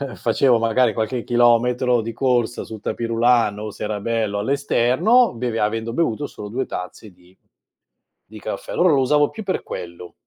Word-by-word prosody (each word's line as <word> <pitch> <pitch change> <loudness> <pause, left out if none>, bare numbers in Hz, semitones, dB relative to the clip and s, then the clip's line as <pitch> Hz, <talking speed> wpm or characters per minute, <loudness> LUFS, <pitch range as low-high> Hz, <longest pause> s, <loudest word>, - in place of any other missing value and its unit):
facevo 120 +1 +2
magari 115 0 +2
qualche 110 +2 -2
chilometro 120 0 +2
di 115 +1 -5
corsa 120 -1 0
sul 110 - -9
tapis 115 +2 -3
roulant 115 -2 +2
o, 105 0 -6
se - - -8
era 105 -1 -3
bello, 110 -1 -1
all'esterno 140 - +2
beve 115 -1 -3
avendo 115 +2 -1
bevuto 145 -3 -1
solo 105 -5 -9
2 125 +5 -3
tazze 90 +4 -7
di 90 +1 -24 0.9
di - - -11
caffè. - - -6
Allora 180 - +3
lo 140 - +3
usavo 145 +3 +3
più 220 - -8
per 190 - -2
quello. 85 0 -8
115 Hz, 170 wpm, -21 LUFS, 110-130 Hz, 0.9 s, Allora